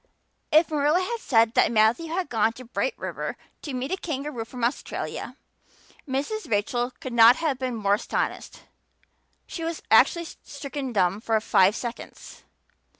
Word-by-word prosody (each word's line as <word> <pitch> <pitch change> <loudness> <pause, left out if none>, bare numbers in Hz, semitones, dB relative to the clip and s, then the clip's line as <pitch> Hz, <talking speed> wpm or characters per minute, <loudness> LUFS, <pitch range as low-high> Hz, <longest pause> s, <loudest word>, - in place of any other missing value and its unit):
If 315 +2 +4
Marilla 300 +3 +2
had 465 +5 -3
said 230 - +3
that - - +3
Matthew 225 +8 +3
had 355 +2 -2
gone 225 -3 +1
to 255 +2 -11
Bright 465 - -2
River - - -5 0.2
to 290 - -6
meet 255 +4 -3
a 380 - 0
kangaroo 280 -8 -4
from 245 +1 -8
Australia 240 +4 -3 0.7
Mrs. 285 +12 -3
Rachel 240 +3 0
could 260 - -6
not 235 +1 +8
have 290 -5 -1
been 255 -2 -2
more 200 -2 +1
astonished. 205 - -3 0.8
She 330 - -6
was 330 0 -4
actually 340 -1 +5
stricken 280 -4 -7
dumb 195 -1 +1
for 225 -1 +1
five 195 -1 +3
seconds. 240 -1 -8
255 Hz, 150 wpm, -25 LUFS, 225-310 Hz, 0.8 s, not